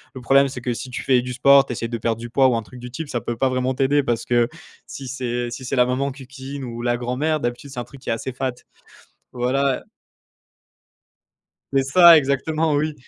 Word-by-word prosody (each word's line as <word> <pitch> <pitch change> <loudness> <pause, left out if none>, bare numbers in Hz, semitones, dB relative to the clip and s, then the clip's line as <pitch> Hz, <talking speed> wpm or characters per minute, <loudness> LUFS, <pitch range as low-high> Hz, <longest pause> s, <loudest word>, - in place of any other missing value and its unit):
Le 130 - -7
problème 135 +3 +4
c'est 130 -2 -7
que 120 0 -2
si 130 - -6
tu 125 - -5
fais 130 -2 +3
du 125 +1 -5
sport, 140 +2 +6
tu - - -3
essaies 115 0 -3
de 115 0 -4
perdre 115 0 -1
du 120 0 -7
poids 135 +1 +4
ou 125 - +2
un 115 - -2
truc 125 +3 -13
du 125 0 -8
type, 150 +6 -6
ça 120 - -2
peut 120 - -4
pas 135 +2 +2
vraiment 130 0 -1
t'aider 140 +2 +2
parce 120 -4 -2
que 120 -1 +2 0.4
si 125 +3 -8
c'est 120 -1 -3
si 120 +2 -7
c'est 130 +2 -3
la 125 -1 +4
maman 130 +3 -1
qui 135 0 -11
cuisine 135 +1 -8
ou 120 -2 -6
la 120 0 0
grand-mère, 130 +6 -1
d'habitude 120 +1 -4
c'est 135 -2 -7
un - - -3
truc 135 +2 -15
qui - - -7
est - - +2
assez 125 +3 -5
fat 130 0 -2 0.8
voilà. 130 +2 0 1.9
C'est 135 - +4
ça 170 +4 +8
exactement, 155 +3 0
oui. 155 +2 0
130 Hz, 235 wpm, -22 LUFS, 120-140 Hz, 1.9 s, ça